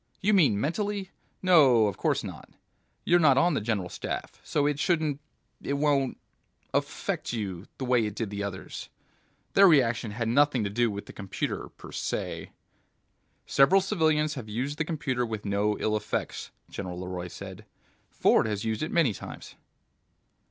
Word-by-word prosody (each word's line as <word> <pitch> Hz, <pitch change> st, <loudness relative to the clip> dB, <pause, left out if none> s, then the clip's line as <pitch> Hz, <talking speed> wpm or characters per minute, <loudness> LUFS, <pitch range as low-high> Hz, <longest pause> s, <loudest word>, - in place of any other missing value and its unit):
"You 210 Hz, +2 st, +2 dB
mean 145 Hz, -, +4 dB
mentally? 195 Hz, -, -2 dB, 0.3 s
No, 140 Hz, -11 st, +6 dB
of 100 Hz, -, -1 dB
course -, -, 0 dB
not. -, -, -8 dB, 0.6 s
You're 175 Hz, +1 st, +5 dB
not 140 Hz, -5 st, +5 dB
on 170 Hz, +5 st, +4 dB
the 140 Hz, -, 0 dB
General 105 Hz, -4 st, -1 dB
Staff, -, -, -5 dB
so 145 Hz, -, 0 dB
it 145 Hz, -1 st, 0 dB
shouldn't... 155 Hz, -4 st, +1 dB, 0.4 s
it 140 Hz, -, -2 dB
won't... 140 Hz, -2 st, +1 dB, 0.6 s
affect -, -, -2 dB
you 100 Hz, -4 st, -4 dB
the 130 Hz, -, -3 dB
way 125 Hz, -3 st, +3 dB
it 105 Hz, -, -6 dB
did 115 Hz, -3 st, -3 dB
the 100 Hz, 0 st, -4 dB
others. 100 Hz, -2 st, -6 dB, 0.6 s
Their 195 Hz, 0 st, +8 dB
reaction 120 Hz, -8 st, +3 dB
had 115 Hz, +2 st, -3 dB
nothing 135 Hz, 0 st, +3 dB
to 100 Hz, -, -2 dB
do 120 Hz, +2 st, +2 dB
with 100 Hz, -1 st, -5 dB
the -, -, -11 dB
computer 100 Hz, -2 st, -4 dB
per -, -, -13 dB
se -, -, -4 dB, 0.4 s
..." -, -, -45 dB
"Several 175 Hz, +8 st, +5 dB
civilians 155 Hz, -6 st, +1 dB
have 125 Hz, -7 st, -7 dB
used 130 Hz, +7 st, -3 dB
the 155 Hz, -, +1 dB
computer 135 Hz, -6 st, -1 dB
with 110 Hz, -3 st, -4 dB
no 105 Hz, +1 st, +1 dB
ill 110 Hz, -, 0 dB
effects," 105 Hz, 0 st, -3 dB, 0.2 s
General 90 Hz, -2 st, -6 dB
LeRoy 90 Hz, -1 st, -5 dB
said. -, -, -9 dB, 0.4 s
"Ford -, -, +3 dB
has 105 Hz, 0 st, -3 dB
used 110 Hz, -1 st, -1 dB
it 155 Hz, -, -1 dB
many 155 Hz, -10 st, +3 dB
times." -, -, -9 dB
125 Hz, 165 wpm, -28 LUFS, 105-155 Hz, 0.6 s, Their